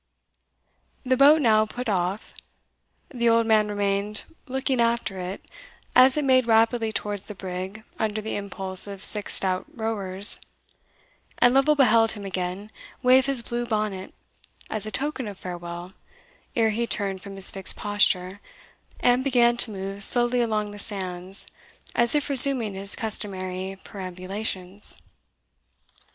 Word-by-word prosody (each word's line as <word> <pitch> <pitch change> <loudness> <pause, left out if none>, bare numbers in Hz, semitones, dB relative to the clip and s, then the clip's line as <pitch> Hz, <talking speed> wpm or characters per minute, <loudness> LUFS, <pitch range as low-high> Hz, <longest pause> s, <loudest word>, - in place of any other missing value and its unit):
The 255 0 +2
boat 290 +4 +5
now 215 -2 +3
put 245 +3 -6
off. 190 0 -2 0.8
The 235 -2 +1
old 230 0 +3
man 215 -1 +3
remained 205 0 -2 0.2
looking 265 -1 -1
after 230 -5 -1
it 180 +2 -7 0.5
as 260 +2 +6
it 295 - 0
made 255 -2 +3
rapidly 225 0 +2
towards 205 -2 -4
the 210 - -8
brig 190 +3 -7 0.2
under 215 -1 -1
the 220 +1 -5
impulse 195 -1 +4
of 200 -1 -8
six 210 -1 +5
stout 185 -1 -1
rowers, 205 -3 -3 1.0
and 245 0 +4
Lovel 275 +3 +3
beheld 230 -5 +4
him 205 -2 -9
again 190 +2 -5 0.3
wave 260 +1 +4
his 270 -4 0
blue 240 +1 -3
bonnet 210 -5 -3 0.6
as 215 -1 -1
a - - -4
token 270 -2 -4
of 200 -2 -8
farewell 175 0 -8 0.6
ere 225 -1 +2
he 235 +2 -2
turned 195 -4 -2
from 195 0 -10
his 195 -1 +6
fixed 195 -1 -1
posture, 200 -2 0 0.6
and 245 +1 +2
began 240 -3 +3
to 240 - +4
move 195 0 -6
slowly 240 +2 +4
along 215 -3 -2
the 205 - -10
sands 190 -2 -3 0.5
as 235 +3 +3
if 295 - +1
resuming 260 -6 +4
his 195 +1 -2
customary 190 -3 -4
perambulations. 185 0 -5
210 Hz, 140 wpm, -24 LUFS, 195-235 Hz, 1.0 s, as